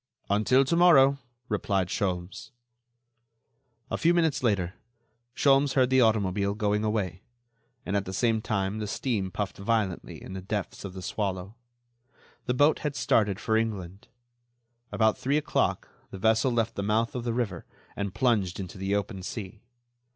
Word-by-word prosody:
"Until 125 +6 +4
to 150 - +1
morrow," 140 -6 +6 0.3
replied 100 -4 0
Sholmes. 90 -3 -3 1.4
A - - -1
few 170 +1 +3
minutes 165 -4 +2
later 100 -7 0 0.6
Sholmes 135 0 +3
heard 130 -2 +3
the 130 0 +5
automobile 100 -3 +2
going 105 0 0
away, 100 -5 -1 0.6
and 100 - -2
at 100 -1 0
the 95 - -5
same 110 +3 +1
time 100 -1 -1
the 105 - -3
steam 100 0 -2
puffed 100 +1 -4
violently 100 -3 -1
in - - -9
the 95 - -5
depths 100 +1 -4
of 100 -2 -6
The 95 -1 -8
Swallow. 95 -1 -3 0.9
The 125 - +1
boat 145 +4 +4
had 150 -2 -3
started 115 -7 +2
for 110 - 0
England. 100 -4 -3 0.8
About 110 -1 +2
three 140 +3 +1
o'clock 150 - 0 0.2
the - - -8
vessel 110 +5 +2
left 115 -1 0
the - - -4
mouth 110 +3 0
of 125 - -4
the 120 - -1
river 105 -8 -3 0.3
and 100 -1 -3
plunged 105 -9 +1
into 95 0 -7
the 95 +1 0
open 100 -1 -3
sea. 100 +1 -7
105 Hz, 160 wpm, -27 LUFS, 95-125 Hz, 1.4 s, morrow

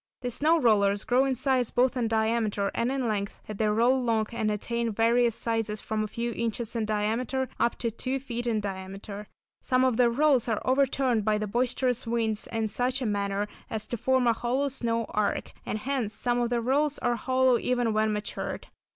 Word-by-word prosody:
These 245 -1 -2
snow 315 +6 +3
rollers 205 -5 +3
grow 250 +4 +3
in 265 -1 0
size 255 -2 +1
both 250 +2 +2
in 240 -3 0
diameter 220 -2 0
and 235 +2 0
in 265 -3 -1
length, 200 -2 -2
as 215 - -6
they 215 - +1
roll 230 +4 +3
along, 230 -4 0
and 220 -2 -1
attain 235 +2 -1
various 230 +2 +3
sizes 225 -2 -2
from 215 +1 -2
a - - -2
few 235 +3 -3
inches 230 0 -3
in 225 -2 0
diameter 225 +5 -1
up 235 - +2
to 230 -2 -2
two 255 +4 -3
feet 240 -2 -5
in 220 -2 +1
diameter. 195 +1 -6 0.3
Some 255 0 +2
of 250 -3 +2
the 245 -1 +5
rolls 260 -1 +3
are 220 - +1
overturned 260 -3 +2
by 215 0 +2
the 215 - -2
boisterous 245 +2 0
winds 225 -2 -1
in 225 -1 0
such 250 +5 -1
a - - -2
manner 200 -1 -1 0.2
as 215 -1 -3
to - - -1
form 260 +2 +2
a 235 - +4
hollow 255 +5 -1
snow 230 -3 -1
arch, 210 -1 -1
and - - -1
hence 240 -3 -2
some 245 +1 0
of 240 - 0
the 240 -1 0
rolls 285 +4 +1
are 240 0 0
hollow 255 0 +2
even 245 -3 0
when 215 0 +2
matured. 210 0 -4
235 Hz, 205 wpm, -27 LUFS, 215-250 Hz, 0.3 s, the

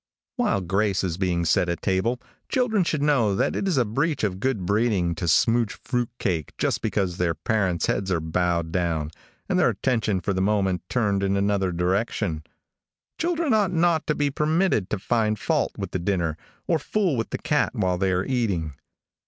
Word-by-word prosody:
While 240 - +1
grace 95 +2 0
is 90 -1 -2
being 90 -3 0
said 85 +2 +2
at 85 - -3
table, 105 +6 0 0.3
children 230 -6 +2
should 155 -4 -1
know 125 -9 +3
that - - 0
it 195 - -1
is 180 -7 +1
a 125 - +3
breach 140 +7 -1
of 95 -3 -1
good 110 -5 -1
breeding 100 -4 +1
to 85 +1 -4
smouge 115 +7 +3
fruit 125 -2 -1
cake 85 -6 -2
just - - 0
because 95 -4 -1
their 85 -3 0
parents' 95 0 0
heads 100 -1 -1
are 85 - +2
bowed 85 0 -1
down, 80 -4 -1 0.4
and - - +1
their - - +4
attention 115 -6 0
for 95 +3 -2
the 95 - -1
moment 95 -2 +1
turned 105 -5 +1
in 100 0 +1
another 100 -2 +1
direction. 90 -1 -1 0.8
Children 335 -4 +1
ought 205 -4 +2
not 165 -1 +2
to 150 - +1
be 145 -1 0
permitted 155 - +1
to 105 - -1
find 110 +1 0
fault - - 0
with - - -5
the 95 - -2
dinner, 85 -3 -1 0.3
or 165 -2 +2
fool 185 0 0
with 115 -1 -2
the - - -3
cat - - 0
while 90 -1 0
they 95 -1 +1
are 90 +1 0
eating. 100 - -1
100 Hz, 190 wpm, -24 LUFS, 90-130 Hz, 0.8 s, their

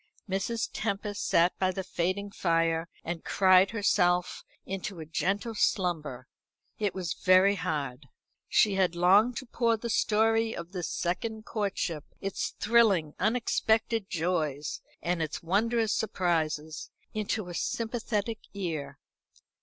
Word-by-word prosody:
Mrs. 195 +4 -1
Tempest 205 -1 -2
sat 170 +2 +3
by 185 - +2
the 190 +1 -4
fading 185 +3 -2
fire, 165 -2 +1
and 165 0 -4
cried 190 0 +5
herself 180 -5 +1 0.2
into 195 -1 -5
a 160 - -6
gentle 200 +8 -1
slumber. 165 - -1 0.5
It 205 -2 -1
was 180 -4 -2
very 185 +2 +5
hard. 145 -7 -3 0.4
She 210 - +4
had 185 -3 +1
longed 200 +8 +4
to 260 - -5
pour 230 -1 +1
the 235 +1 -4
story 225 +1 +2
of 170 +1 -7
this 180 -3 -3
second 220 +5 -3
courtship 195 -7 -2 0.2
its 195 -1 -3
thrilling, 205 -9 +3
unexpected 225 -1 +1
joys, 155 -4 -1 0.2
its 165 -3 -2
wondrous 220 +5 +1
surprises 160 -6 -1 0.2
into 215 -2 -2
a - - -6
sympathetic 225 +1 -2 0.2
ear. 155 -8 -4
190 Hz, 120 wpm, -29 LUFS, 170-215 Hz, 0.5 s, cried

